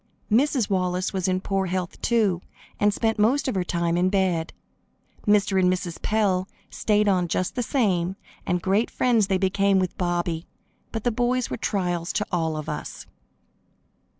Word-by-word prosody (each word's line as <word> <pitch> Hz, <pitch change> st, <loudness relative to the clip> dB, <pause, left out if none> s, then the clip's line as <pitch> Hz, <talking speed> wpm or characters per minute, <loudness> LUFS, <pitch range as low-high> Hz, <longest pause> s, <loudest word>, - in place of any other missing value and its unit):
Mrs. 255 Hz, 0 st, +3 dB
Wallace 185 Hz, -1 st, 0 dB
was 190 Hz, -2 st, -1 dB
in 185 Hz, 0 st, 0 dB
poor 195 Hz, -1 st, -1 dB
health, 180 Hz, 0 st, -3 dB
too, 210 Hz, -7 st, +2 dB, 0.4 s
and 205 Hz, 0 st, +4 dB
spent 225 Hz, +1 st, 0 dB
most 245 Hz, +8 st, +3 dB
of 260 Hz, -, 0 dB
her 190 Hz, -2 st, 0 dB
time 170 Hz, -1 st, 0 dB
in 180 Hz, +1 st, +3 dB
bed. 185 Hz, -4 st, 0 dB, 0.8 s
Mr. 205 Hz, -2 st, +3 dB
and 180 Hz, 0 st, +4 dB
Mrs. 180 Hz, -2 st, -4 dB
Pell 195 Hz, -4 st, +1 dB, 0.2 s
stayed 210 Hz, -1 st, +1 dB
on 180 Hz, -3 st, +2 dB
just 180 Hz, +2 st, -1 dB
the 250 Hz, -, -2 dB
same, 190 Hz, -, 0 dB, 0.3 s
and 180 Hz, -1 st, -1 dB
great 200 Hz, +5 st, +2 dB
friends 230 Hz, -5 st, +2 dB
they 190 Hz, -2 st, +2 dB
became 195 Hz, +1 st, +2 dB
with 185 Hz, -1 st, 0 dB
Bobby, 175 Hz, -2 st, -1 dB, 0.4 s
but 225 Hz, -2 st, -4 dB
the 245 Hz, -, +2 dB
boys 245 Hz, +2 st, 0 dB
were -, -, -1 dB
trials 180 Hz, -6 st, -1 dB
to 210 Hz, -, 0 dB
all 160 Hz, -3 st, 0 dB
of 155 Hz, 0 st, -6 dB
us. 150 Hz, -, -6 dB
190 Hz, 170 wpm, -24 LUFS, 180-210 Hz, 0.8 s, and